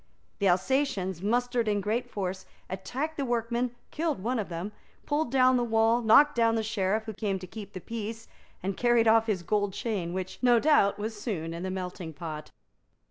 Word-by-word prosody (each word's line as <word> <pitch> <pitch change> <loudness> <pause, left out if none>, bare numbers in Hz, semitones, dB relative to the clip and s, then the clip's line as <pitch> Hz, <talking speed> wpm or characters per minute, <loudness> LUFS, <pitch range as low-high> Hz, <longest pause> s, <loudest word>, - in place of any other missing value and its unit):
The 200 - +2
Alsatians 190 - +1
mustered 240 +2 +1
in 205 -1 +2
great 215 +5 -1
force, 190 -2 -4 0.2
attacked 265 +12 -4
the 280 - -1
workmen, 240 0 -1 0.2
killed 315 - -1
one 245 +2 0
of 205 - -3
them, 175 +4 -4 0.3
pulled 295 -1 0
down 255 -1 +5
the 245 - +1
wall, 225 +1 +3
knocked 285 +7 +6
down 230 -2 +3
the 225 - 0
Sheriff 210 -1 0
who 220 0 -6
came 200 -2 -1
to 185 - -8
keep 205 +1 -9
the 185 - -6
peace, 225 +1 -6 0.4
and 195 +1 -1
carried 240 0 +3
off 225 0 +5
his 195 -5 -1
gold 205 +1 0
chain, 195 -8 -2
which, 185 0 -5
no 245 -2 +5
doubt, 285 -8 +4
was 210 0 -5
soon 165 -8 -3
in 170 - -6
the 185 - -3
melting 180 -3 -5
pot. 155 0 -7
220 Hz, 190 wpm, -28 LUFS, 190-240 Hz, 0.4 s, knocked